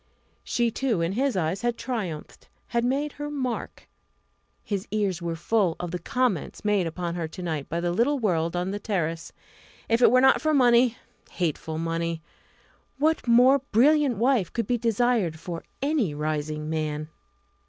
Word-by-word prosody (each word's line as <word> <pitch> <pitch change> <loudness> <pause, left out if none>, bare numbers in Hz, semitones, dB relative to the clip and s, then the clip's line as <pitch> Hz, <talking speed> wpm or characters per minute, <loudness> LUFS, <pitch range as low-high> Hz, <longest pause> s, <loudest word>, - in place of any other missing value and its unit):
She, 235 -1 0
too, 230 -7 0
in 165 +1 0
his 255 +1 0
eyes, 180 +3 -1
had 240 -1 -1
triumphed 195 -12 -5 0.2
had 235 0 0
made 275 +4 0
her 295 +1 -6
mark. 260 -5 -4 0.8
His 200 -2 -3
ears 200 -5 -1
were 170 -1 -2
full 175 0 +1
of 175 -1 -4
the 180 - -3
comments 225 - -1
made 205 -4 +2
upon 170 +1 -4
her 170 -2 -3
to 180 +3 -9
night 155 -5 -3
by 170 +1 -2
the 175 0 0
little 240 +10 +2
world 170 -7 0
on 180 +2 -1
the 205 - -3
terrace. 165 -6 -2 0.6
If 230 +1 +2
it - - +7
were 255 - +5
not 265 +1 +5
for 310 -1 +2
money 240 -2 +4 0.4
hateful 160 -2 -2
money! 165 0 -2 0.7
what 310 -1 +1
more 250 +4 +6
brilliant 275 +1 +4
wife 235 -5 +2
could 230 -2 -2
be 240 +3 0
desired 225 -7 +1
for 170 0 -6 0.2
any 275 - +1
rising 150 0 -3
man? 155 -1 -3
200 Hz, 165 wpm, -26 LUFS, 165-245 Hz, 0.8 s, it